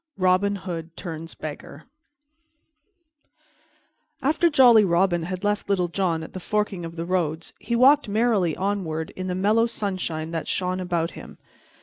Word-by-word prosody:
Robin 185 +2 +2
Hood 170 -4 -7
Turns 165 -2 -7
Beggar 150 0 -8 2.4
AFTER 315 +5 +3
JOLLY 245 -7 +7
ROBIN 175 -1 +2
had 180 +3 -5
left 205 0 -1
Little 180 -3 +1
John 170 -3 -1
at - - -10
the 185 - -5
forking 210 -1 -2
of 165 0 -7
the 165 0 -4
roads, 165 -3 -2
he 235 - -2
walked 265 0 +5
merrily 210 -6 +1
onward 180 -5 -2
in 185 0 -6
the 180 - -2
mellow 215 +5 +3
sunshine 180 -8 -3
that 165 -1 -4
shone 185 0 -1
about 175 -2 -1
him. - - -11
185 Hz, 145 wpm, -24 LUFS, 165-205 Hz, 2.4 s, JOLLY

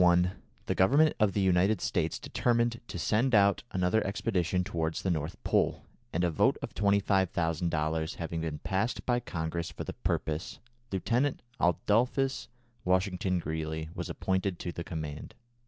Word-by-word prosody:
In 90 - +7
1881 90 +1 +2 0.2
the - - 0
Government 145 +11 +4
of 105 -3 +3
the 100 - +1
United 95 +3 +3
States - - 0
determined 120 -1 0
to - - -6
send 115 +8 +2
out 100 -1 +5
another 90 +3 +1
expedition 95 -3 0
towards 80 -4 -2
the 95 - +1
North 80 +2 -2
Pole, - - +1 0.3
and 90 - 0
a 85 - +2
vote 75 - +3
of - - -5
$25,000 85 -6 +1
having 85 -1 -4
been 80 -2 -3
passed 95 +9 -1
by 120 -1 +2
Congress 85 -5 -3
for - - -6
the - - -5
purpose, 80 +2 -2 0.3
Lieutenant 120 +8 0 0.2
Adolphus 125 +9 +1 0.4
Washington 90 0 +1
Greely 80 -1 -3
was 90 0 -5
appointed 95 +1 -1
to 85 - -4
the 85 - -5
command. 80 -3 -6
90 Hz, 155 wpm, -30 LUFS, 80-100 Hz, 0.4 s, In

